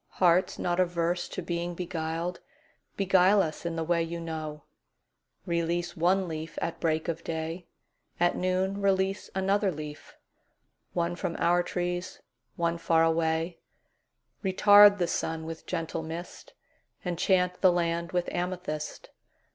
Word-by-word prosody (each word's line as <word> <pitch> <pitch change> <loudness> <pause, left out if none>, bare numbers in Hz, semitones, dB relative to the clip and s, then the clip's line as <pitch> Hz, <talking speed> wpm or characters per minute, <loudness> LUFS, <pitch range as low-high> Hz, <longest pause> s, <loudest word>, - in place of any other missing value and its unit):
Hearts 180 0 +3
not 175 0 -1
averse 175 -1 0
to 185 - -5
being 170 0 -3
beguiled, 170 0 -3 0.6
Beguile 195 +1 +4
us 155 +2 -4
in 165 - -3
the 165 - -1
way 170 +1 +1
you 165 +1 -3
know; 155 -2 -5 0.8
Release 170 0 -1
one 180 +3 +2
leaf 160 -1 -6
at 165 - -3
break 160 -1 0
of 165 0 -3
day; 165 +2 -4 0.5
At 175 0 +3
noon 185 +2 0
release 195 0 +1
another 195 +1 +2
leaf; 150 -2 -9 0.8
One 175 0 0
from 175 -1 -3
our 175 +1 +3
trees, 175 0 -3 0.4
one 170 0 0
far 165 -1 +3
away; 165 +1 +1 0.8
Retard 205 +1 +7
the 180 - +1
sun 160 -1 -2
with 160 0 -8
gentle 165 -2 -3
mist; 165 +2 -8 0.5
Enchant 180 +1 +1
the 185 - +6
land 170 0 -1
with 180 -2 0
amethyst. 175 -4 -4
175 Hz, 130 wpm, -28 LUFS, 165-180 Hz, 0.8 s, Retard